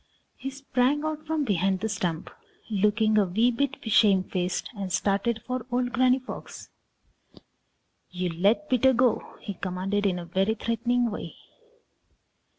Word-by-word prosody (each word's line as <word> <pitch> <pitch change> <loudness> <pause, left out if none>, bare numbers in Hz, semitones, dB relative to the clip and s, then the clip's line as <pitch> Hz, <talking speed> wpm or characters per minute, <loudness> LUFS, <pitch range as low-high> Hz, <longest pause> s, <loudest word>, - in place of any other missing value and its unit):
He 270 - -5
sprang 270 +1 0
out 310 0 -4
from 315 -1 0
behind 190 -3 +1
the 220 - 0
stump, 180 -6 -3 0.4
looking 215 +1 +3
a 205 - +3
wee 220 +7 +2
bit 280 +3 -1
shame 205 -4 +4
faced, 180 -1 -2
and 195 -2 -5
started 210 +4 0
for 250 -1 -4
old 245 0 0
Granny 255 +1 +4
Fox. 260 -1 -9 1.4
"You 180 0 -2
let 200 - +1
Peter 260 -1 +4
Rabbit - - -2
go!" 245 -2 +1
he 200 - -5
commanded 195 +2 -1
in 180 -2 0
a 175 - -6
very 190 +5 0
threatening 235 +1 0
way. 210 - -6
220 Hz, 150 wpm, -26 LUFS, 195-250 Hz, 1.4 s, shame